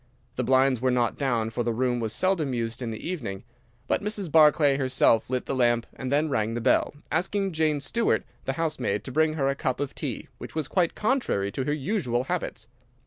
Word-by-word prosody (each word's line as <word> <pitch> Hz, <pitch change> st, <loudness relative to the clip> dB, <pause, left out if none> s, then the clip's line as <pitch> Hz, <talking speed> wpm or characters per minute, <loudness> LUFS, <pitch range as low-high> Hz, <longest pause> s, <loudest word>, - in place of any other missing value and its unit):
The 125 Hz, -, -1 dB
blinds 130 Hz, -1 st, +3 dB
were 130 Hz, -, +2 dB
not 120 Hz, -2 st, +1 dB
down, 120 Hz, -5 st, 0 dB
for 120 Hz, -, -2 dB
the 120 Hz, 0 st, 0 dB
room 125 Hz, 0 st, +1 dB
was 110 Hz, -2 st, -2 dB
seldom 165 Hz, -, 0 dB
used 115 Hz, +1 st, -3 dB
in 120 Hz, -, -3 dB
the 110 Hz, +6 st, -6 dB
evening, 115 Hz, -, -4 dB, 0.4 s
but -, -, +1 dB
Mrs. 205 Hz, -5 st, -3 dB
Barclay 150 Hz, -2 st, +5 dB
herself 130 Hz, -4 st, +2 dB
lit 130 Hz, -1 st, -1 dB
the -, -, -2 dB
lamp 120 Hz, -2 st, +2 dB
and 130 Hz, 0 st, -5 dB
then 150 Hz, +2 st, +2 dB
rang 115 Hz, -5 st, -1 dB
the -, -, -1 dB
bell, 120 Hz, -, +2 dB, 0.2 s
asking 195 Hz, +4 st, 0 dB
Jane 155 Hz, -2 st, +1 dB
Stewart, 230 Hz, -, 0 dB, 0.2 s
the 135 Hz, -, -1 dB
housemaid, 150 Hz, -10 st, -1 dB
to -, -, -6 dB
bring 155 Hz, +2 st, +2 dB
her 140 Hz, -3 st, +1 dB
a 140 Hz, -, +2 dB
cup 130 Hz, -2 st, -2 dB
of 145 Hz, -1 st, -3 dB
tea, -, -, -4 dB
which -, -, -9 dB
was 155 Hz, -4 st, -1 dB
quite 175 Hz, 0 st, +1 dB
contrary 210 Hz, -, 0 dB
to 130 Hz, -, -3 dB
her 145 Hz, -, 0 dB
usual 140 Hz, -, -1 dB
habits. 160 Hz, -9 st, -3 dB
135 Hz, 210 wpm, -26 LUFS, 120-160 Hz, 0.4 s, Barclay